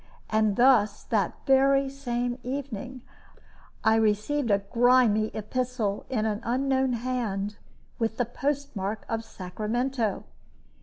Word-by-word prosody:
And 215 -2 +2
thus, 240 -4 +4
that 205 -5 0
very 275 0 +4
same 245 -2 -3
evening, 255 -1 -5 0.8
I 220 0 +4
received 225 +5 +1
a 200 - +5
grimy 230 +1 +3
epistle, 220 -1 -3
in 225 -5 0
an 210 -1 -1
unknown 265 +1 +1
hand, 225 -5 -2 0.4
with 225 -1 -1
the 245 - +1
postmark 245 -5 -3
of 225 0 -2
Sacramento. 220 +4 -2
235 Hz, 110 wpm, -27 LUFS, 215-260 Hz, 0.8 s, a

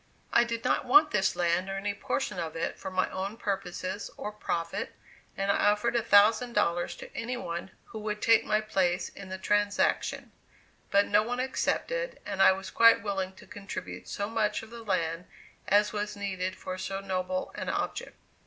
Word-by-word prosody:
I 235 - +6
did 230 -1 -3
not - - +1
want 295 +4 +6
this 190 - +2
land 175 +2 +1
or 195 - -3
any 205 +1 -2
portion 205 -1 -2
of 165 -2 -4
it 165 - -3
for - - -5
my 185 0 +1
own 195 +4 -4
purposes 190 -2 -3
or 210 - -4
profit, 170 -5 -3 0.4
and 195 +1 +1
I 205 - +3
offered 235 +3 +1
a 235 - +3
thousand 225 +3 +5
dollars 175 -5 +1
to - - -11
any 245 +2 -3
one 170 -5 -5 0.2
who 220 - -8
would 210 0 -3
take 225 0 +5
my 215 0 +1
place 190 -4 0
in 195 -1 -11
the 190 - -4
transaction; 205 +1 0 0.6
but 200 0 +4
no 210 +1 +4
one 245 +3 -3
accepted, - - -1
and 195 - -2
I - - +8
was 190 +1 -4
quite 230 -2 +6
willing 195 -2 -2
to - - -15
contribute 205 -3 -7
so 200 - -3
much 215 -1 0
of 225 - -12
the 235 0 -8
land 175 -4 -1 0.4
as 205 +2 +4
was 210 0 -3
needed 185 -2 -3
for 185 0 -6
so 195 +1 -3
noble 185 -1 -2
an - - -4
object. - - -3
205 Hz, 190 wpm, -29 LUFS, 185-220 Hz, 0.6 s, I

